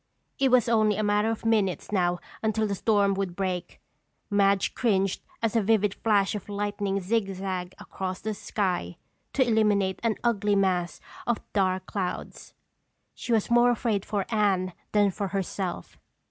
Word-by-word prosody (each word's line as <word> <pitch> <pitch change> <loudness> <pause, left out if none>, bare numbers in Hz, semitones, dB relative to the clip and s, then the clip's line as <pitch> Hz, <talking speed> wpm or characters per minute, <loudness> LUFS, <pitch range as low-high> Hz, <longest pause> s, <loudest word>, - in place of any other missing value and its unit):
It 270 - +4
was 250 -2 +4
only 215 -2 +3
a 215 - 0
matter 210 +1 +2
of 225 0 -4
minutes 210 -7 +1
now 180 -3 +1 0.2
until 220 0 +1
the 205 - -1
storm 200 0 +2
would 190 -3 -3
break. 180 -2 -3 0.5
Madge 200 -1 +3
cringed 195 -5 +1 0.2
as 225 0 0
a 225 - +4
vivid 210 -1 +2
flash 205 -3 +2
of 210 -1 -6
lightning 205 -1 -1
zigzagged 190 -3 -2
across 185 -1 -5
the 220 - -3
sky 180 - -2 0.4
to 260 -2 +2
illuminate 205 -4 +2
an 230 -2 +1
ugly 210 -3 +2
mass 185 -3 0 0.3
of 240 -2 +1
dark 185 -2 +1
clouds. 185 -2 -5 0.6
She - - -6
was 225 0 +1
more 240 +1 +6
afraid 225 -4 0
for 200 -3 -2
Anne 195 -4 +1 0.2
than 205 -1 +3
for 200 +1 -3
herself. 190 -1 -4
200 Hz, 155 wpm, -27 LUFS, 190-220 Hz, 0.6 s, more